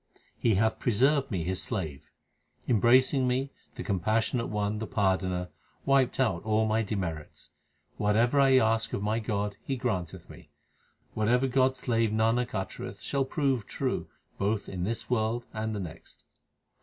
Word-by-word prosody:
He 115 -3 +2
hath 110 +3 +1
preserved 135 +5 +2
me 90 -6 -2
His 90 +2 -2
slave. 80 - -4 0.6
Embracing 125 +3 +4
me, 130 +2 0 0.2
the - - -5
Compassionate 110 +5 0
One, 105 0 -1
the 110 - -4
Pardoner, 95 -3 0 0.4
wiped 135 -2 +3
out 110 -10 +1
all 110 0 +1
my 110 +1 +1
demerits. 90 -8 -5 0.5
Whatever 115 +6 +2
I 135 -1 +6
ask 115 -2 +2
of 100 - -2
my 110 +2 0
God 105 -2 -2
He 135 - -2
grant 105 - -2
eth - - -14
me. - - -14 0.6
Whatever 120 +4 +2
God 130 0 +3
s - - -12
slave 115 -2 +1
Nanak 115 +2 +1
uttereth 95 -1 -5
shall 140 -1 -1
prove 135 -5 0
true - - -2 0.3
both 100 +1 0
in 90 -2 -3
this 115 +2 -3
world 120 0 0
and 110 0 -3
the - - -3
next. 85 -3 -9
110 Hz, 155 wpm, -28 LUFS, 100-125 Hz, 0.6 s, I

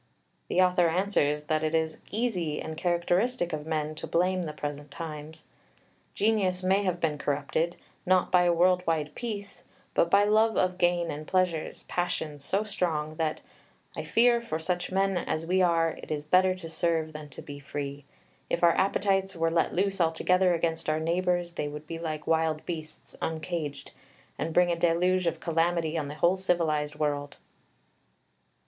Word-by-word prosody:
The 185 - +3
author 180 -1 +3
answers 160 -5 +1
that 155 +1 0
it 155 +1 0
is 160 -1 0
easy 185 -9 -1
and 160 - -5
characteristic 175 +4 0
of 150 0 -4
men 155 -1 -1
to 155 - -7
blame 185 +2 +1
the 160 -3 -3
present 145 0 -6
times. 155 +1 -8 0.7
Genius 195 -4 +1
may 190 +2 +3
have 180 -3 -1
been 155 -3 -1
corrupted, 145 +4 -1 0.3
not 185 0 +2
by 180 -1 +5
a 175 - +4
world 180 +2 +4
wide 155 -2 0
peace, 205 -4 -5 0.3
but 170 - +3
by 200 +3 +5
love 215 +2 +3
of 185 0 +1
gain 175 -1 +2
and 150 +1 -7
pleasure, 180 -4 +1 0.2
passions 155 -5 -2
so 195 +8 0
strong 160 -7 -2
that 160 -1 -1 0.5
"I - - -4
fear, 235 0 +4
for 195 -9 -3
such 175 +3 -2
men 195 0 +1
as 165 -2 -2
we 185 +2 +2
are 165 -2 +3
it - - -11
is 150 -1 -2
better 185 +4 +4
to 185 -3 -8
serve 160 -1 0
than 150 -1 -8
to 135 - -10
be 145 -1 -8
free. 140 0 -5 0.5
If 170 - -1
our 170 -1 +6
appetites 195 0 +1
were 165 0 +1
let 165 0 +1
loose 195 +1 +1
altogether 180 +2 +3
against 165 -1 -1
our 155 0 +1
neighbours, 175 +1 0
they 150 -3 -3
would 150 +1 -7
be 165 +1 -6
like 155 -2 -4
wild 160 -1 +1
beasts 155 -3 -7
uncaged, 160 -2 -4 0.5
and 165 - -2
bring 175 +1 +4
a - - +1
deluge 175 +2 +2
of 165 -1 -1
calamity 165 -1 0
on 155 -3 -1
the 145 - -6
whole 170 +5 +3
civilised 160 -5 0
world." 145 -1 -2
170 Hz, 175 wpm, -28 LUFS, 155-185 Hz, 0.7 s, our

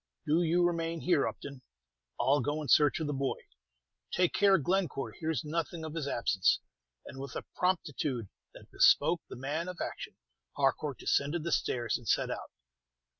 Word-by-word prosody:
"Do 160 +4 +3
you 175 +1 +3
remain 165 -1 -1
here, 170 -6 +2
Upton. 140 -2 -7 0.6
I'll 140 +1 +3
go 145 +4 -2
in - - -6
search 150 +2 +5
of 160 - -2
the 145 - -2
boy. 135 -1 -1 0.7
Take 180 -1 +2
care 200 -1 +5
Glencore 175 -3 -1
hears 160 0 -2
nothing 165 +1 -3
of 155 - -6
his 160 -4 -3
absence." 105 -7 +2 0.5
And 135 - -9
with 135 -1 -7
a - - -5
promptitude 150 - -1 0.3
that - - -14
bespoke 170 0 +4
the - - -7
man 145 +7 -3
of 180 -1 -6
action, - - -5 0.4
Harcourt 140 0 +1
descended 150 +4 0
the 170 - -2
stairs 120 -5 0
and 120 - -14
set - - +1
out. - - -5
155 Hz, 170 wpm, -31 LUFS, 140-170 Hz, 0.7 s, search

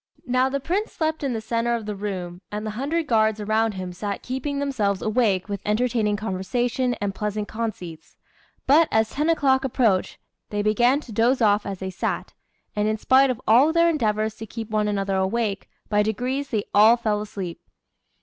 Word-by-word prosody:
Now 255 +1 +2
the 280 +1 -1
Prince 370 +10 -2
slept 315 -1 -2
in 270 -3 0
the 225 - -3
centre 230 +1 0
of 225 -2 -5
the 210 -1 -4
room, 185 -3 -5
and 210 +1 -4
the 215 - -3
hundred 290 +9 -2
guards 220 -4 +2
around 215 +1 +1
him 185 -1 -5
sat 200 +2 -4
keeping 265 +3 -3
themselves 220 -9 -1
awake 215 -5 +1
with 200 -2 -4
entertaining 220 -1 +1
conversation 240 +5 -1
and 205 -1 -3
pleasant 210 +1 -3
conceits. 185 -8 -6 0.5
But, 305 +4 +5
as 220 0 +2
ten 300 +3 0
o'clock 275 -5 +3
approached, 230 -7 +1 0.3
they 205 0 -2
began 240 +7 +3
to 245 - -12
doze 235 +5 +2
off 210 -2 +3
as 195 -1 -4
they 190 0 -5
sat; 180 - -3 0.4
and 210 0 +1
in 215 0 0
spite 265 +4 +4
of 250 -2 -2
all 255 +8 +6
their 335 +1 +4
endeavours 215 -7 0
to 225 - -8
keep 225 0 -7
one 215 -1 +1
another 195 -1 -1
awake, 200 +1 -1 0.2
by 210 -1 +2
degrees 255 +6 -2
they 215 -4 -1
all 220 +3 +7
fell 215 -3 -1
asleep. 195 -5 -6
220 Hz, 190 wpm, -24 LUFS, 205-255 Hz, 0.5 s, all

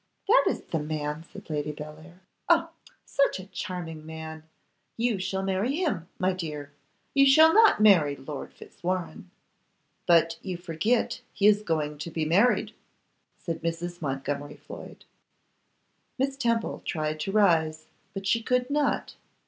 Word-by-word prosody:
'That 470 +5 +5
is - - -2
the 165 - -2
man,' 150 0 -3
said 200 - -11
Lady 150 -1 -2
Bellair. 155 +4 -11 0.3
'Oh! - - +4 0.3
such 275 -7 +1
a 185 - -8
charming 175 -5 -6
man. 160 0 -8 0.6
You 230 -3 +1
shall 190 +1 -2
marry 195 +8 0
him, 300 - -1
my 185 0 +1
dear; 150 -5 -6 0.4
you 275 0 +6
shall 315 +4 +7
not 440 - +6
marry 165 -9 +6
Lord 140 +1 -7
Fitzwarrene.' 180 0 -5 0.8
'But 165 -1 +4
you 185 -2 -4
forget 175 +7 0
he 200 - -1
is 210 0 +6
going 150 -6 -2
to 160 - -5
be 160 -1 -2
married,' 195 +10 +3 0.6
said 165 -2 -5
Mrs. 170 +1 -4
Montgomery 145 0 -3
Floyd. - - -11 1.1
Miss 270 +1 0
Temple 235 -4 -1
tried 155 -2 -2
to 195 - -2
rise, 160 -6 +3 0.3
but 195 0 -5
she 210 +5 +2
could 250 +3 0
not. 295 0 0
175 Hz, 140 wpm, -27 LUFS, 155-210 Hz, 1.1 s, shall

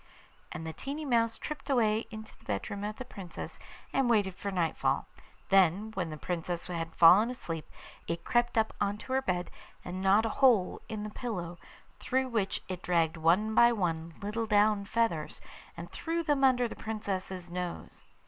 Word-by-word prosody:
And 160 - -6
the 160 - -4
tiny 290 - -5
mouse 230 -3 +2
tripped 295 -1 -6
away 225 -4 +2
into 220 0 -9
the - - -25
bedroom 110 - -3
of 210 +1 -3
the 255 - -7
Princess, 195 -8 -8 0.3
and 265 -3 +2
waited 205 -5 +3
for 200 - -5
nightfall; 175 -4 0 0.4
then, 195 +3 +4
when 180 -5 -2
the 155 - -6
Princess 175 +1 -3
had 165 -2 -4
fallen 190 +7 +7
asleep, 165 -10 -5 0.4
it 170 0 -3
crept 240 -1 +1
up 220 0 +2
on 205 0 +1
to 260 - -6
her 265 - +3
bed, 180 -7 -2 0.3
and 180 +1 -4
gnawed 195 +3 +4
a - - +1
hole 235 -8 +3
in 215 -1 -4
the 210 - -5
pillow, 180 -8 -5 0.4
through 260 0 0
which 215 -5 -1
it 185 -1 -5
dragged 170 -3 +1
one 175 +7 +2
by 235 +2 +7
one 165 -6 -2
little 220 +2 -2
down 210 -1 +3
feathers, 200 -7 -1 0.4
and - - -8
threw 335 +1 -2
them 290 -3 +1
under 250 -2 +4
the - - -8
Princess's 190 -5 -4
nose. 180 -1 -5
205 Hz, 175 wpm, -30 LUFS, 175-230 Hz, 0.4 s, fallen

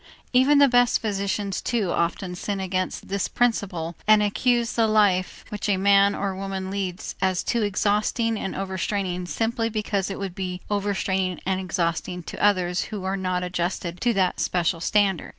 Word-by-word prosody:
Even 265 +3 +5
the 285 0 +7
best 245 -1 +4
physicians 200 -2 -2
too 220 -7 0
often 180 +2 -1
sin 195 +2 -3
against 185 -1 -2
this 195 -1 -1
principle 190 -9 -1
and 215 -1 +6
accuse 235 +3 +1
the 230 -1 +2
life 205 -4 +2
which 210 0 -4
a 195 - +3
man 200 +1 +4
or 195 -1 -2
woman 190 0 -4
leads 190 -3 -4
as 185 -1 +1
too 235 - 0
exhausting 210 +2 +1
and 195 -3 -4
overstraining 190 -1 -2
simply 225 - -1
because 210 -3 -1
it 195 - -4
would 195 -2 -4
be 180 -1 -4
overstraining 190 -2 -1
and 190 0 0
exhausting 180 -1 -2
to - - -6
others 185 -3 +2
who 210 -4 -6
are 190 +1 -1
not 185 -1 -1
adjusted 175 0 -3
to 240 - +3
that 190 -4 +1
special 175 -1 0
standard. 195 -1 +1
195 Hz, 170 wpm, -24 LUFS, 185-210 Hz, -, the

